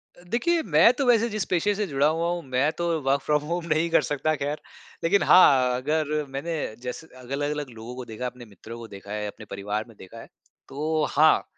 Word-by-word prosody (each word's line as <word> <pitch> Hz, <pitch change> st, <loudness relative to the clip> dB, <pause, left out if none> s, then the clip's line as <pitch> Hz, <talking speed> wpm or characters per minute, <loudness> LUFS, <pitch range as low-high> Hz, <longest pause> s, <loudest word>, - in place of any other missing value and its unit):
अ, 175 Hz, -, -18 dB
देखिए 335 Hz, +8 st, +2 dB
मैं 170 Hz, +9 st, +8 dB
तो 275 Hz, -, +2 dB
वैसे 235 Hz, -1 st, +4 dB
जिस 215 Hz, -2 st, -2 dB
पेशे 195 Hz, +4 st, +2 dB
से 210 Hz, +1 st, -1 dB
जुड़ा 140 Hz, -2 st, +2 dB
हुआ 165 Hz, +2 st, 0 dB
हूँ 175 Hz, 0 st, -2 dB
मैं 130 Hz, +4 st, +1 dB
तो 170 Hz, -, -1 dB, 0.2 s
वर्क 140 Hz, +1 st, +3 dB
फ़्रॉम 150 Hz, +1 st, +1 dB
होम 175 Hz, -1 st, -2 dB
नहीं 160 Hz, +2 st, 0 dB
कर 165 Hz, -, +4 dB
सकता 155 Hz, +2 st, 0 dB
ख़ैर। 145 Hz, +1 st, -3 dB, 0.4 s
लेकिन 195 Hz, +4 st, +3 dB
हाँ, 130 Hz, -8 st, +6 dB
अगर 150 Hz, +3 st, -1 dB
मैंने 140 Hz, +5 st, -4 dB, 0.3 s
जैसे 125 Hz, +5 st, -6 dB
अलग-अलग 145 Hz, +3 st, -3 dB
लोगों 115 Hz, +1 st, -9 dB
को 125 Hz, -1 st, -7 dB
देखा 110 Hz, +1 st, -8 dB
है, 125 Hz, -, 0 dB
अपने 125 Hz, 0 st, -13 dB
मित्रों 110 Hz, +2 st, -11 dB
को 115 Hz, -1 st, -9 dB
देखा 100 Hz, -1 st, -11 dB
है, 105 Hz, 0 st, -3 dB
अपने 105 Hz, -, -10 dB
परिवार 105 Hz, +2 st, -3 dB
में 115 Hz, -, -16 dB
देखा 95 Hz, +5 st, -12 dB
है। -, -, -11 dB, 0.4 s
तो 155 Hz, +2 st, -1 dB
हाँ, 155 Hz, +1 st, +4 dB
145 Hz, 220 wpm, -25 LUFS, 125-165 Hz, 0.4 s, मैं